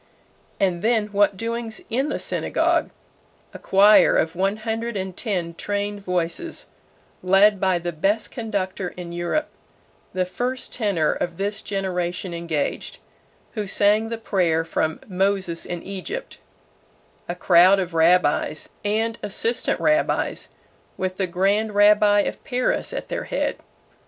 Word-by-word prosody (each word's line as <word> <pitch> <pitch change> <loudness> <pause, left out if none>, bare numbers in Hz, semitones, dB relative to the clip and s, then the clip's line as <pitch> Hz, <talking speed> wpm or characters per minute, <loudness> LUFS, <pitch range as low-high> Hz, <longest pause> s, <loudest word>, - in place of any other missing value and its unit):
And 180 -3 +1
then 220 -1 +1
what 205 -1 +2
doings 230 0 -3
in 265 +6 0
the - - -2
synagogue! - - 0 0.6
A - - -9
choir 205 +2 +5
of 160 +1 0
one 195 +3 0
hundred 225 0 -3
and 190 -1 -4
ten 180 -7 -2
trained 205 +3 -3
voices, 180 - -2 0.6
led 195 +2 +4
by 190 -2 +2
the 175 0 -3
best 195 +7 0
conductor 200 -5 -3
in 175 -1 -7
Europe 175 - -2 0.6
the 185 0 0
first 245 +8 -3
tenor 200 -10 +1
of 175 -1 -3
this 205 +1 -2
generation 180 -2 -3
engaged, 170 -3 -3 0.5
who 210 -3 -4
sang 210 +3 +2
the 230 - -3
prayer 175 -7 0
from 160 -1 -1
"Moses 190 -3 0
in 175 -1 -5
Egypt" 330 - -6 0.9
a 175 - -2
crowd 180 +2 +6
of 180 -3 -3
rabbis, 165 -2 +2
and 220 +2 0
assistant 225 +4 -1
rabbis, 310 +1 +1 0.5
with 185 0 -3
the 190 - 0
grand 200 +4 0
rabbi 205 0 +5
of - - -4
Paris 250 -1 0
at - - -5
their - - -3
head. - - -2
195 Hz, 135 wpm, -23 LUFS, 180-215 Hz, 0.9 s, crowd